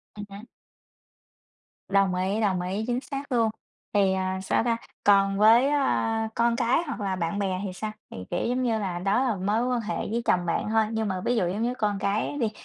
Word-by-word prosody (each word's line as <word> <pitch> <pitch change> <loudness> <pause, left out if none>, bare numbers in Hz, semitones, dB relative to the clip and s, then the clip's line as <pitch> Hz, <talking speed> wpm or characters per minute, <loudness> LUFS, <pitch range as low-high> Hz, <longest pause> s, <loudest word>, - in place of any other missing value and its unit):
À - - -12
há. 200 +1 -9 1.5
Đồng 195 -2 +3
ý, 195 +4 0
đồng 190 -4 +1
ý, 190 +4 -2
chính 245 0 0
xác 280 -1 -6
luôn. 230 -2 +3 0.4
Thì, 195 -2 +3
à, 190 0 -1
sao 225 - +1
ta? 230 -1 +1 0.3
Còn 195 -1 +4
với, 230 +5 +6
a, 225 -6 +1
con 235 0 +2
cái 245 +7 +2
hoặc 275 - -4
là 190 -2 -1
bạn 175 +3 -2
bè 190 -2 -1
thì 185 - -4
sao? 215 +3 -4 0.2
Thì, - - -8
kiểu, - - -1
giống 250 +1 0
như 225 -3 +1
là, 180 -4 -3
đó 200 +7 +1
là 240 -5 0
mối 210 +6 0
quan 245 -2 0
hệ 215 - -3
với 235 +2 -2
chồng 180 -1 +2
bạn 170 +5 -1
thôi, 220 0 +3
nhưng 220 -1 -1
mà 185 -1 -2
ví 245 - +2
dụ, 185 -6 +1
giống 200 +5 -2
như, 245 +2 0
con 205 -4 -1
cái 210 +9 -1
đi, 220 -3 0
210 Hz, 225 wpm, -26 LUFS, 190-235 Hz, 1.5 s, với